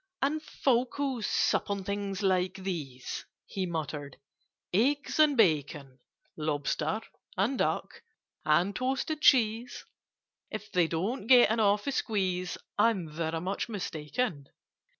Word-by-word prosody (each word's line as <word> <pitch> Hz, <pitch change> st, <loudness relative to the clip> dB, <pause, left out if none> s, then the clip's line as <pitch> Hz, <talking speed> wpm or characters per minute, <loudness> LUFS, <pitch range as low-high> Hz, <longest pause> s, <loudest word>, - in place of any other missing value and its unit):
"And 305 Hz, +3 st, +1 dB
folk 255 Hz, -5 st, 0 dB
who 270 Hz, -4 st, -1 dB
sup 210 Hz, -, +1 dB
on 200 Hz, -1 st, -2 dB
things 200 Hz, 0 st, -3 dB
like 185 Hz, -1 st, +2 dB
these—" 160 Hz, -10 st, -5 dB, 0.2 s
He 190 Hz, -2 st, -3 dB
muttered, 150 Hz, -4 st, -4 dB, 0.6 s
"eggs 280 Hz, -, +1 dB
and 300 Hz, -3 st, +5 dB
bacon— 145 Hz, -, +1 dB, 0.4 s
Lobster—and 160 Hz, -, -2 dB
duck—and 175 Hz, +6 st, -1 dB
toasted 270 Hz, +4 st, -1 dB
cheese— 240 Hz, -2 st, +3 dB, 0.6 s
If 215 Hz, -1 st, -7 dB
they 175 Hz, -2 st, +3 dB
don't 195 Hz, +8 st, -2 dB
get 245 Hz, -3 st, +7 dB
an 225 Hz, -, +1 dB
awful 210 Hz, +5 st, +2 dB
squeeze, 185 Hz, -7 st, -1 dB, 0.2 s
I'm 205 Hz, -7 st, +2 dB
very 160 Hz, +1 st, -3 dB
much 190 Hz, +6 st, -3 dB
mistaken! 165 Hz, -, -3 dB
195 Hz, 110 wpm, -30 LUFS, 160-235 Hz, 0.6 s, get